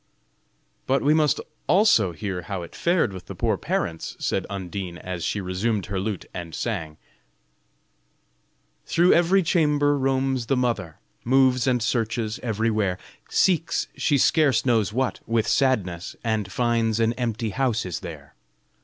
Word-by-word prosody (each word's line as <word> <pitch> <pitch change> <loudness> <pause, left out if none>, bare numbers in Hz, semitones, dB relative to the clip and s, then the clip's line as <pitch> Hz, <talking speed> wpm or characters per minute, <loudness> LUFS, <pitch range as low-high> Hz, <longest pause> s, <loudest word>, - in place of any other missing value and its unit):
'" - - -44
"But 135 +1 +2
we 145 +2 +4
must 155 -2 +2 0.3
also 155 - +4
hear 95 +1 -4
how 90 +1 -5
it 85 - -11
fared 170 - +1
with 95 -1 -9
the - - -7
poor - - +1
parents," 80 -1 -3
said - - -1
Undine, 95 -2 -5
as 90 -2 -6
she 105 - -1
resumed 95 +2 -1
her 95 -1 -3
lute, 100 -1 -3
and 85 -2 -6
sang: 85 -10 -3 1.9
Thro' 175 +2 +4
every 180 +3 +4
chamber 150 -4 +2
roams 135 -2 0
the 135 - +1
mother, 110 -10 -1 0.3
Moves 130 0 +3
and 125 -3 +2
searches 115 -1 -1
everywhere, 110 -4 0 0.3
Seeks, 170 -3 +2
she 145 - +2
scarce 145 0 +3
knows 115 -6 +2
what, 130 +3 -1
with 115 -1 +1
sadness, 100 -12 0
And 110 -4 -1
finds 115 0 +1
an 115 0 +2
empty 115 -2 -2
house 120 -3 0
is 90 - -4
there. 75 -3 -9
115 Hz, 145 wpm, -24 LUFS, 95-135 Hz, 1.9 s, we